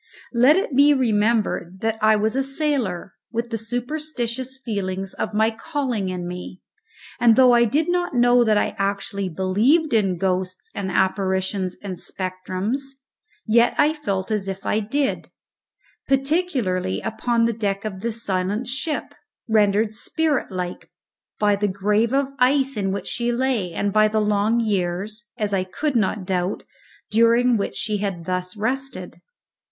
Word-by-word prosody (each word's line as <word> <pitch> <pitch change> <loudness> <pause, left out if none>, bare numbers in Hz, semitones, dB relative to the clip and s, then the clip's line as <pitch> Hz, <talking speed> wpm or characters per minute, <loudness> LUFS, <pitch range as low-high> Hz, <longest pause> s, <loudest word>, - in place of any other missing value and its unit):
Let 250 +6 +6
it 375 -7 -1
be 285 +2 +6
remembered 215 -6 0
that 225 0 -1
I 215 0 +5
was 215 +3 0
a 270 - +2
sailor, 270 - -1 0.2
with 235 +1 -3
the 225 - -1
superstitious 250 +1 -3
feelings 195 -3 -3
of - - -4
my 220 +1 +3
calling 245 - -3
in 180 -1 -4
me, 180 +1 -7 0.6
and 230 -2 +5
though 255 0 +6
I 235 0 +5
do 295 +8 +1
not 350 -4 0
know 245 0 +5
that 215 -2 +3
I - - 0
actually 200 -1 -1
believed 215 - +2
in 195 -5 +2
ghosts 185 0 -2
and 195 -1 -3
apparitions 190 0 0
and 190 -3 -5
spectrums, 185 +7 -3 0.6
yet 235 +1 +3
I 300 +1 +4
felt 200 -10 -3
as 205 -2 -1
if 195 0 -5
I 215 - +1
did; 270 +6 -1 0.8
particularly 270 - 0
upon 230 +1 0
the 230 - +1
deck 200 -2 -2
of 195 -3 -4
this 230 +2 -2
silent 195 +5 -1
ship, 290 +5 -3 0.3
rendered 210 0 +2
spirit 300 +4 -1
like 180 -1 -5 0.5
by 205 -1 +3
the 205 +1 0
grave 210 +4 +1
of 275 0 +1
ice 270 +1 +3
in 195 -2 -1
which 200 - -4
she 240 0 -1
lay 240 -7 0
and 200 +4 -2
by 215 0 +5
the 215 0 0
long 210 +2 +2
years 205 +2 -2
(as 210 -3 -1
I 190 -1 +1
could 265 +10 -3
not 210 -3 0
doubt) 185 0 -1 0.5
during 230 +2 +4
which 200 -10 -2
she 210 +8 0
had 195 -5 -3
thus 185 +2 -3
rested. 265 +6 -3
215 Hz, 155 wpm, -22 LUFS, 190-245 Hz, 0.8 s, Let